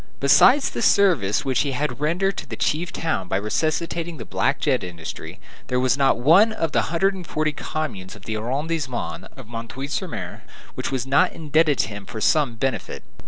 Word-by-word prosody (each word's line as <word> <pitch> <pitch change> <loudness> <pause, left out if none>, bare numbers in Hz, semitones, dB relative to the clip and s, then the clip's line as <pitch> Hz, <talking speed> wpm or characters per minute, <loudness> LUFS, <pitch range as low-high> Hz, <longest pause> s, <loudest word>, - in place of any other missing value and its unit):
Besides 250 - +5
the - - -4
service 180 - +3
which 130 -3 +1
he 140 -2 0
had 145 +2 -2
rendered 180 +6 0
to - - -6
the - - -5
chief 160 +2 -1
town 160 - -2
by 95 - 0
resuscitating 160 - -2
the 115 - -7
black - - 0
jet - - +1
industry, 85 -3 -7 0.3
there 125 - 0
was 130 0 +2
not 135 -3 +3
one 170 - +5
out - - -10
of 165 -2 0
the - - +2
hundred 190 +4 +2
and 185 -3 -8
forty 155 0 0
communes 110 -12 -5
of 105 - -15
the 110 - -3
arrondissement 130 +3 -3
of 120 -3 -12
M. 115 0 -5 0.2
sur 180 +5 -3
M. 90 -4 -7 0.3
which - - -4
was 130 -2 -1
not 140 +7 +3
indebted 155 -2 +2
to - - 0
him 100 -2 -8
for 110 - -6
some 140 0 +2
benefit. 130 +3 -3
145 Hz, 200 wpm, -23 LUFS, 115-165 Hz, 0.3 s, Besides